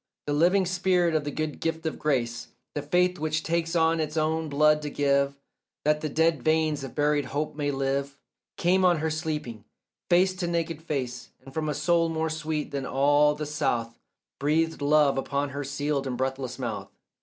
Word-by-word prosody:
The 145 - -1
living 180 +6 +3
spirit, 175 -3 +1
the 145 - -3
good 155 +1 -3
gift 165 0 -2
of 160 - -3
grace, 120 -6 -1 0.3
The 145 - -2
faith 180 +5 +1
which 155 0 -1
takes 165 +1 -1
of 165 0 +3
its 155 0 -2
own 160 0 0
blood 150 +1 +4
to 150 - -4
give 140 -1 +1 0.5
That 150 0 +2
the 155 - -2
dead 160 -1 +2
veins 155 0 +1
of 135 - -8
buried 145 -1 +2
hope 145 +4 -3
may 145 -1 -1
live, 140 0 -1 0.4
Came 185 +2 +3
on 175 -2 +5
her 160 +1 -1
sleeping, 150 - -4 0.5
face 185 +1 +4
to 180 -2 -2
naked 165 -2 -2
face, 130 -6 -4 0.2
And 135 - -12
from 155 0 -2
a 150 - -1
soul 170 +1 +2
more 160 0 -1
sweet 155 -1 -3
than 140 -2 -3
all 145 +2 +3
the 150 0 -4
south 120 -6 -2 0.4
Breathed 160 +2 +1
love 145 -1 +4
upon 140 +1 -1
her 140 +1 -4
sealed 140 0 -2
and 125 -2 -3
breathless 130 -1 -3
mouth. 125 -3 -4
150 Hz, 185 wpm, -27 LUFS, 140-160 Hz, 0.5 s, on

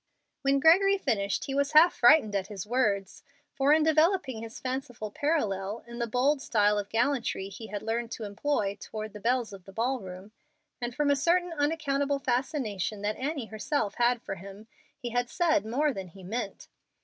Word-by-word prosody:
When 275 0 +2
Gregory 390 +7 +5
finished 205 - -1
he 270 - -4
was 280 +2 0
half 325 +3 +7
frightened 240 -4 +5
at 195 -1 -1
his 200 -3 -6
words, 210 -5 0 0.3
for 275 +1 +2
in 310 0 +5
developing 315 - +2
his 230 0 -8
fanciful 255 -5 -4
parallel 210 -8 -1
in 235 0 -9
the 235 - -1
bold 265 +5 +1
style 210 -4 +2
of 200 0 -5
gallantry 235 -4 0
he 220 +3 -9
had 205 -1 -5
learned 230 +1 -2
to 225 - -6
employ 205 0 -1
toward 215 -1 -6
the 210 - -8
belles 240 0 0
of 190 -2 -11
the 195 - -11
ball 245 +6 -1
room, 190 0 -10 0.5
and 240 0 -4
from 295 -1 +2
a - - +4
certain 345 +4 +1
unaccountable 290 -2 0
fascination 240 - -2
that 210 +1 -1
Annie 275 -1 -3
herself 220 +1 -2
had 240 0 +2
for - - -4
him, 195 +3 -10 0.3
he 245 -4 -5
had 245 0 0
said 315 - +1
more 285 +5 +1
than 190 -4 -6
he 185 +2 -14
meant. 210 +2 -5
240 Hz, 185 wpm, -28 LUFS, 205-285 Hz, 0.5 s, half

